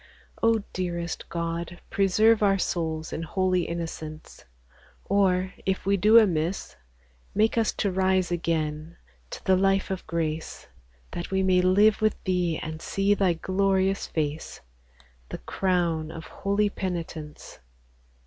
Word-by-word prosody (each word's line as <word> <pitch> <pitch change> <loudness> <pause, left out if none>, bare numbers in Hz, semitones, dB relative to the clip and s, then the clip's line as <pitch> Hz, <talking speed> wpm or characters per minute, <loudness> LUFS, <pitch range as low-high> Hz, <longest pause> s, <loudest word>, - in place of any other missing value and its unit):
O 225 -2 +3
dearest 175 -2 -4
God, 170 +1 -4
preserve 215 +3 +4
our 195 -1 +4
souls 160 -4 -2
In - - -3
holy 185 +1 0
innocence! 160 -2 -7 0.6
Or, 190 -2 +2
if 190 -1 -1
we 200 +1 +3
do 215 +4 +6
amiss, 180 -4 +2 0.6
Make 215 +2 +3
us 225 -2 +2
to 200 - -1
rise 185 -1 +1
again 160 -1 -2 0.3
to - - -8
th' 185 -1 +3
life 195 0 +2
of 190 - -4
Grace, 160 -1 -3 0.4
That 175 - -5
we 190 0 +1
may 185 -1 +4
live 205 +4 +4
with 215 -1 +2
Thee 180 -3 0
and 160 0 -6
see 195 +1 +1
Thy 195 -3 +2
glorious 190 +2 0
face, 155 -1 -3 0.7
The - - -5
Crown 170 - -1
of 165 -1 -8
holy 205 +1 0
penitence. 165 -5 -6
185 Hz, 130 wpm, -26 LUFS, 165-195 Hz, 0.7 s, do